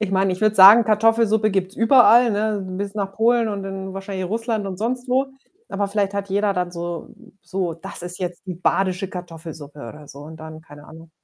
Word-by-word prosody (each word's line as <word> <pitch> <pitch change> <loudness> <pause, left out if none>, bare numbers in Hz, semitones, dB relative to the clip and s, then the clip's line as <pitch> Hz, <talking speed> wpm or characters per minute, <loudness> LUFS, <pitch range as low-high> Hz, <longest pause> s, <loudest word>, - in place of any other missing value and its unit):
Ich 210 -3 -2
meine, 190 -1 +1
ich 180 - -6
würde 215 0 +3
sagen, 205 +5 +9
Kartoffelsuppe 220 0 +2
gibt's 190 0 -2
überall, 240 0 +5
ne, 210 0 -1 0.2
bis 200 0 -4
nach 200 -2 -3
Polen 230 +1 +2
und 200 -1 -4
dann 190 0 -7
wahrscheinlich 195 -1 -5
Russland 225 0 -2
und 190 -1 -5
sonst 245 +5 -3
wo. 260 +2 +1 0.4
Aber 200 0 -2
vielleicht 200 0 -2
hat 200 0 -4
jeder 200 +1 0
dann 180 -1 -2
so 170 -1 -6 0.3
so 185 -3 -3
„das 165 +1 -10
ist 175 0 -6
jetzt 180 -1 -5
die 180 - -5
badische 185 +2 -1
Kartoffelsuppe“ 160 -5 -10
oder 145 +4 -10
so 140 - -12
und 155 +2 -11
dann 160 0 -10
keine 145 -2 -15
Ahnung. 165 0 -14
195 Hz, 205 wpm, -21 LUFS, 175-215 Hz, 0.4 s, sagen